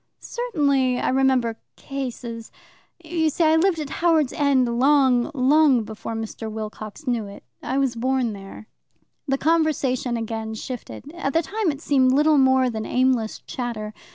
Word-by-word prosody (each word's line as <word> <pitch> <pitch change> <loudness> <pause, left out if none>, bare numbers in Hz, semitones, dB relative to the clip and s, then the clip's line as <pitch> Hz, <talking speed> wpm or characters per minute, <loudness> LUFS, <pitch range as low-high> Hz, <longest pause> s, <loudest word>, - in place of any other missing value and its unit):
"Certainly 280 - 0
I - - 0
remember 255 -3 +2 0.2
cases 240 -4 -6 0.5
you 320 -1 0
see 330 - 0
I 315 0 +4
lived 345 +1 +2
at 300 -3 -5
Howards 320 -5 +3
End 260 -5 +1
long, 265 -3 +4
long 270 -1 +4
before 220 +1 -7
Mr. 225 0 -5
Wilcox 215 +4 -7
knew 235 -5 -1
it. 200 - -12 0.2
I 265 - -2
was 270 -3 +1
born 250 -1 0
there." 195 +2 -10 0.6
The 270 0 +1
conversation 280 -6 +1
again 220 -1 -4
shifted. 255 +4 -8
At 280 -6 -3
the 330 - +2
time 425 +1 -1
it 285 0 -9
seemed 260 -4 +3
little 300 +1 +4
more 260 -1 +4
than 220 -1 -4
aimless 250 -2 0
chatter. 230 -4 -5
260 Hz, 155 wpm, -23 LUFS, 230-295 Hz, 0.6 s, I